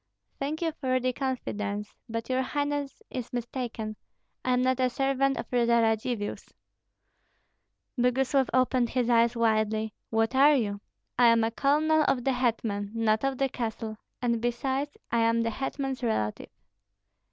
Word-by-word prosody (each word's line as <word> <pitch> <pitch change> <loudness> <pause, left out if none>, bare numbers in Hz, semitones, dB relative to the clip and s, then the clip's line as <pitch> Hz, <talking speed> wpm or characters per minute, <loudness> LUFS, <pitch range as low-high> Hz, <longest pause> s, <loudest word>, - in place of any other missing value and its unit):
"Thank 305 +4 -2
you 325 - +1
for 260 -4 0
the 255 0 0
confidence. 210 -6 -3 0.2
But 230 0 -3
your 260 0 +1
highness 290 +5 -2
is 250 -2 -5
mistaken. 235 -3 -4 0.5
I 255 - +1
am 250 0 +2
not 260 0 +1
a 255 -1 +3
servant 270 +1 +1
of - - -4
the 250 - +1
Radzivills." 230 -2 +1 1.5
Boguslav 260 +2 +2
opened 255 -1 +2
his 245 -1 0
eyes 235 0 +4
widely. 220 -1 +1 0.2
"What 225 +2 +1
are 285 +3 +6
you?" 205 -6 -1 0.4
"I 245 - +7
am 230 -1 +5
a 225 - +1
colonel 305 +5 +3
of 260 -3 +1
the 270 - +2
hetman, 225 -5 -1
not 220 0 +2
of 270 -1 0
the 270 - +2
castle; 225 -3 -4 0.3
and 235 -2 +1
besides 265 +4 -1
I 235 - +2
am 230 0 +3
the 230 - -1
hetman's 270 +2 -3
relative." 110 - -1
245 Hz, 150 wpm, -28 LUFS, 225-270 Hz, 1.5 s, I